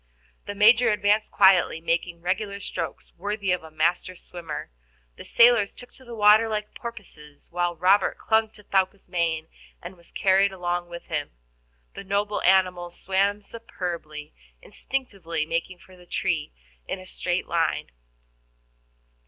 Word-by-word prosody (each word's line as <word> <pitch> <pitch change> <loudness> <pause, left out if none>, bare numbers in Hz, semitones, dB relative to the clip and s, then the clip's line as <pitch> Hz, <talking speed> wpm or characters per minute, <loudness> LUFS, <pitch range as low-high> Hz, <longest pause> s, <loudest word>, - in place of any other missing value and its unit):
The 205 - -5
Major 225 +4 +6
advanced 210 0 +2
quietly, 190 -4 +5
making 170 +1 -2
regular 200 +3 -2
strokes, 165 -6 -6
worthy 200 +1 -2
of 180 - 0
a 160 - -12
master 170 +4 0
swimmer. 170 - -7 0.4
The - - -10
sailors 235 -4 +4
took 245 - -12
to 260 - -17
the 240 -2 -9
water 215 +1 +6
like 210 -1 -3
porpoises, 180 -11 -11
while 175 0 -1
Robert 185 +4 +3
clung 220 0 +1
to 210 - -17
Thaouka's 195 0 0
mane, 165 -3 -1 0.3
and 180 +2 -9
was 170 -1 -13
carried 195 0 +3
along 175 -1 -3
with 170 0 -8
him. 150 -2 -4 0.6
The - - -8
noble 200 +2 -1
animal 185 -2 +3
swam 195 +3 0
superbly, 170 -9 -7 0.3
instinctively 185 - -4
making 170 +3 -3
for 185 +1 -18
the 180 -1 -18
tree 160 -4 -1 0.4
in - - -3
a 185 - -12
straight 180 -1 -2
line. 170 -1 -1
185 Hz, 145 wpm, -25 LUFS, 170-205 Hz, 0.6 s, Major